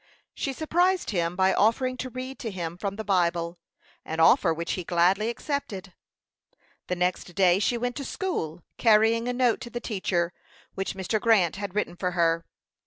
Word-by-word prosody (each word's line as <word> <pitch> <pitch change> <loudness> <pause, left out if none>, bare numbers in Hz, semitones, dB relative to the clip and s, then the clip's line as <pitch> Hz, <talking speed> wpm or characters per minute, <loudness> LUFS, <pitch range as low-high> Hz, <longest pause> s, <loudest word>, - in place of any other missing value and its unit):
She 275 - -3
surprised 350 +5 +1
him 170 -3 -1
by 190 +1 +3
offering 255 +4 +2
to 255 - -4
read 255 +2 -7
to 230 - -4
him 170 -4 -5
from 195 +2 -4
the 220 - -5
Bible 175 -3 0 0.4
an 160 +1 -5
offer 165 +1 +5
which 165 +1 -3
he 180 - -2
gladly 180 +6 +2
accepted. 225 - -4 0.9
The 180 - -1
next 180 -1 -2
day 185 -1 +4
she 240 +4 +1
went 245 +1 -2
to 280 - -4
school, 175 - -3 0.2
carrying 225 +1 +4
a 250 - 0
note 245 -1 +2
to 240 - -7
the 240 +1 -4
teacher, 185 -6 -1 0.4
which 195 0 -3
Mr. 195 +3 -1
Grant 200 -8 +3
had 200 -2 -5
written 210 -4 -1
for 180 0 -2
her. 165 -1 +2
195 Hz, 175 wpm, -26 LUFS, 175-240 Hz, 0.9 s, offer